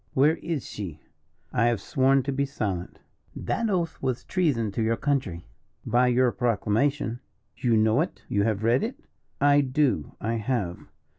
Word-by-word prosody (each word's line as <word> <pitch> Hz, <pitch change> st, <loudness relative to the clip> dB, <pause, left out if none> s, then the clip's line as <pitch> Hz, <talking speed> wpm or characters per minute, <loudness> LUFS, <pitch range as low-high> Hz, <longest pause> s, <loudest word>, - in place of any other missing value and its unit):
"Where 150 Hz, +5 st, +4 dB
is 160 Hz, -4 st, -3 dB
she?" 90 Hz, -8 st, -6 dB, 0.5 s
"I 115 Hz, -, +3 dB
have 120 Hz, -3 st, +1 dB
sworn 135 Hz, +5 st, +2 dB
to 140 Hz, -, -2 dB
be 140 Hz, +1 st, 0 dB
silent." 100 Hz, -10 st, -3 dB, 0.4 s
"That 230 Hz, -1 st, -1 dB
oath 175 Hz, -4 st, -1 dB
was 130 Hz, -2 st, -1 dB
treason 145 Hz, -, 0 dB
to 105 Hz, -, -2 dB
your 115 Hz, +1 st, +1 dB
country." 130 Hz, -, -1 dB, 0.4 s
"By 125 Hz, +2 st, +3 dB
your 125 Hz, 0 st, +3 dB
proclamation." 120 Hz, +2 st, 0 dB, 0.4 s
"You 120 Hz, -3 st, +2 dB
know 110 Hz, +5 st, +3 dB
it? 170 Hz, -, -4 dB
You 100 Hz, -, +1 dB
have 110 Hz, 0 st, 0 dB
read 120 Hz, +3 st, +3 dB
it?" 235 Hz, +4 st, -3 dB, 0.4 s
"I 145 Hz, +1 st, +5 dB
do 135 Hz, -, 0 dB
I 115 Hz, +2 st, -1 dB
have." 105 Hz, -6 st, -2 dB
125 Hz, 160 wpm, -26 LUFS, 110-140 Hz, 0.5 s, I